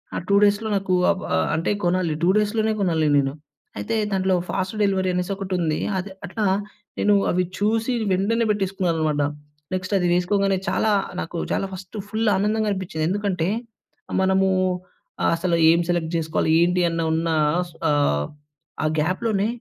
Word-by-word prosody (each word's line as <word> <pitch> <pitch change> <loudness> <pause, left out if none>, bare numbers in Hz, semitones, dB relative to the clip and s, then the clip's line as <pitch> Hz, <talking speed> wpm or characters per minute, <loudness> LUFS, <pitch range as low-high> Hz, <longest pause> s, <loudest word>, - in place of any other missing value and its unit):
ఆ - - -1
2 200 - +4
డేస్‌లో 205 +2 +2
నాకూ 190 -1 0 0.2
ఆవ్ 190 - -3
ఆహ్, 80 - +1
అంటే 165 +5 0
కొనాలి, 175 -2 +1
2 175 - +4
డేస్‌లోనే 215 +1 +1
గొనాలి 160 -4 +1
నేను. 135 0 +1 0.4
అయితే, 105 - -2 0.2
దాంట్లో 190 -1 +1
ఫాస్ట్ 190 +2 -2
డెలివరీ 190 -2 +1
అనేసొకటుంది. 180 -3 -1 0.2
అదె 190 +2 -4
అట్లా 205 +3 -2 0.5
నేను 205 0 +4 0.2
అవి 180 +1 +1
చూసీ 225 +4 +1 0.2
వెంటనే 220 +5 +1
పెట్టేసుకున్నాననమాట. 175 -7 0 0.5
నెక్స్ట్ 185 +2 -3
అది 180 -1 +1
వేసుకోంగానే, 195 +2 +1
చాలా 220 - +1 0.3
నాకు 170 +1 -5
చాలా 195 - 0
ఫస్టు 185 +3 -9
ఫుల్లానందంగనిపిచ్చింది. 205 -5 0
ఎందుకంటే, 190 -4 -1 0.7
మనమూ 190 0 +3 0.7
అ - - +2
అసల 170 0 0
ఏం 170 +1 +5
సెలెక్ట్ 170 -1 -1
జేసుకోవాలి, 160 -1 0
ఏంటి 180 +1 +2
అన్న 165 0 -2
ఉన్నా 165 0 0 0.4
స్ - - -18 0.2
ఆహ్, 110 - +2 0.6
ఆ - - +1
గ్యాప్‍లోనే 195 +5 0
185 Hz, 140 wpm, -23 LUFS, 170-200 Hz, 0.7 s, ఏం